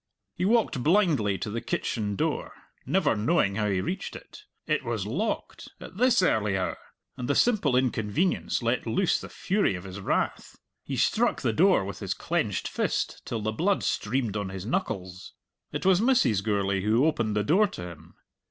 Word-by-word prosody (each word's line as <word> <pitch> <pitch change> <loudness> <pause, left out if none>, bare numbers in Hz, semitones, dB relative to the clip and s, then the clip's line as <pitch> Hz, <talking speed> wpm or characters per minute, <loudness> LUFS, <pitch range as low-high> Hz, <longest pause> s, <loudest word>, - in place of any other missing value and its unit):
He 180 - -2
walked 215 - +2
blindly 150 - +2
to 105 - -4
the 115 +2 -3
kitchen 105 -3 -2
door, - - -2 0.3
never 185 -10 +2
knowing 110 - +2
how 105 +1 0
he 95 -2 0
reached 190 - -4
it. 425 - -12 0.2
It - - 0
was - - -2
locked - - -3
at 185 - -11
this 250 -4 +4
early 105 - +2
hour! 95 - -2 0.4
and 125 - -4
the 145 - +2
simple 215 - +3
inconvenience 125 - 0
let 120 +1 0
loose 180 +11 +1
the - - -8
fury 195 - 0
of 90 - -7
his 95 0 -8
wrath. 100 - -2 0.3
He - - -4
struck - - +1
the - - +1
door - - +4
with - - -6
his - - -3
clenched - - -1
fist - - -2
till 115 - -3
the 110 - 0
blood 190 - +1
streamed 115 -1 -1
on 100 -2 -2
his 95 0 -6
knuckles. 95 - -3 0.4
It - - -4
was 190 0 +5
Mrs. 235 - +3
Gourlay 100 -2 0
who 110 +7 +3
opened 115 -9 0
the 105 - +1
door 195 - +4
to 90 - -8
him. 85 - -14
115 Hz, 180 wpm, -27 LUFS, -, 0.4 s, was